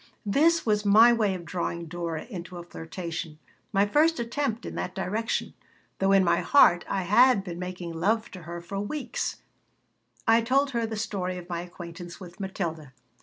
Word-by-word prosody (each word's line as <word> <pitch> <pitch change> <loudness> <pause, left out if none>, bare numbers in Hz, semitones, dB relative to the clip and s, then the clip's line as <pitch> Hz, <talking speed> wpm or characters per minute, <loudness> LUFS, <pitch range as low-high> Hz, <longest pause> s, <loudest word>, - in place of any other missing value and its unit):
This 315 +10 +3
was 210 -2 +2
my 220 +4 +7
way 210 -5 +1
of 175 -2 -8
drawing 170 -1 -3
Dora 165 -1 -4
into 180 -5 -8
a 175 - -7
flirtation, 165 -1 -6 0.3
my 200 -1 +3
first 310 +8 +3
attempt 235 0 -2
in - - -6
that - - -4
direction, 215 +4 -2 0.5
though 195 0 +3
in 195 -1 +6
my 175 - +3
heart 175 -11 +5
I 190 - 0
had 210 +3 +5
been 175 -3 -6
making 180 -2 -5
love 215 +7 0
to 185 - -9
her 170 +1 -7
for 195 +3 -5
weeks 260 +8 -3 0.8
I 225 +1 +6
told 270 +4 +2
her 235 -2 -1
the 220 -1 -5
story 185 -4 -3
of 175 -1 -9
my 170 -1 -2
acquaintance 175 -1 -9
with 175 -1 -11
Matilda. 165 -7 -4
190 Hz, 175 wpm, -27 LUFS, 175-225 Hz, 0.8 s, my